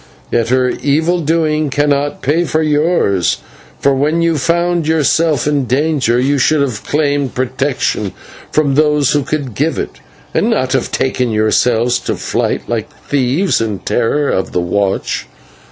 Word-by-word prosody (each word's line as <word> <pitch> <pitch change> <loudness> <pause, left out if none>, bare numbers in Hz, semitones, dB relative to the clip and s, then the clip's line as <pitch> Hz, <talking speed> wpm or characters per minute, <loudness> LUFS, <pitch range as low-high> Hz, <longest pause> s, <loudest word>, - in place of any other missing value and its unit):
Yet 115 -1 +1
her 130 0 +2
evil 160 +7 0
doing 155 -1 +1
cannot 145 +1 0
pay 155 +6 +2
for 160 0 0
yours, 150 - +1 0.4
for 140 - +3
when 150 +5 +1
you 165 -1 +2
found 170 +2 +1
yourself 160 -2 +2
in 145 -2 +1
danger, 130 -1 +1
you 140 +2 +1
should 155 +4 +3
have 125 -7 -2
claimed 145 -2 0
protection 130 -5 -1 0.4
from 150 -3 +2
those 150 -1 +3
who 145 - +2
could 140 -3 -3
give 150 +8 -1
it, - - -5 0.3
and 220 - +1
not 130 - 0
have - - 0
betaken 125 -2 0
yourselves 115 +2 +2
to - - -3
flight - - -2
like 115 -2 -2
thieves 145 +7 +1
in 110 -3 -2
terror 120 - 0
of 95 - -2
the - - +1
watch. 95 +3 -1
140 Hz, 155 wpm, -15 LUFS, 125-155 Hz, 0.4 s, for